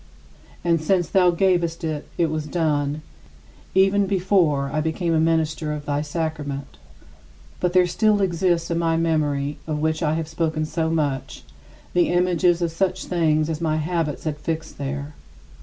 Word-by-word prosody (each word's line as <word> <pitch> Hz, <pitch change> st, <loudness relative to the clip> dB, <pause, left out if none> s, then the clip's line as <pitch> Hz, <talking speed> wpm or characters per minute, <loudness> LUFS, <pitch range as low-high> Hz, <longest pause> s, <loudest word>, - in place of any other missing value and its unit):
And 165 Hz, -2 st, +2 dB
since 175 Hz, +2 st, +1 dB
thou 185 Hz, -2 st, +4 dB
gavest 175 Hz, -2 st, +1 dB
it, 155 Hz, -2 st, -3 dB
it 165 Hz, -2 st, +1 dB
was 155 Hz, -1 st, -3 dB
done 150 Hz, -2 st, 0 dB, 0.7 s
even 195 Hz, +1 st, +4 dB
before 180 Hz, -8 st, +2 dB
I 155 Hz, -, +1 dB
became 165 Hz, +2 st, -1 dB
a 160 Hz, -, +3 dB
minister 160 Hz, -1 st, +1 dB
of 150 Hz, -1 st, -6 dB
thy 145 Hz, -1 st, 0 dB
sacrament. 145 Hz, -, -4 dB, 0.8 s
But 180 Hz, -1 st, 0 dB
there 185 Hz, -1 st, +5 dB
still 210 Hz, +4 st, +2 dB
exist 175 Hz, -2 st, +1 dB
in 170 Hz, -, +1 dB
my 165 Hz, -1 st, +1 dB
memory 150 Hz, -3 st, 0 dB
of 155 Hz, -1 st, -1 dB
which 155 Hz, +1 st, 0 dB
I 155 Hz, -1 st, +1 dB
have 160 Hz, -1 st, -2 dB
spoken 160 Hz, -1 st, -1 dB
so 160 Hz, +1 st, -1 dB
much 145 Hz, -5 st, -2 dB, 0.5 s
the 175 Hz, -1 st, +3 dB
images 175 Hz, -1 st, +2 dB
of 170 Hz, -, 0 dB
such 185 Hz, +3 st, -1 dB
things 155 Hz, -3 st, +1 dB
as 160 Hz, 0 st, -3 dB
my 155 Hz, -2 st, +1 dB
habits 155 Hz, -2 st, -2 dB
had 155 Hz, -2 st, -2 dB
fixed 160 Hz, -1 st, -4 dB
there. 140 Hz, +1 st, -4 dB
160 Hz, 160 wpm, -23 LUFS, 150-175 Hz, 0.8 s, there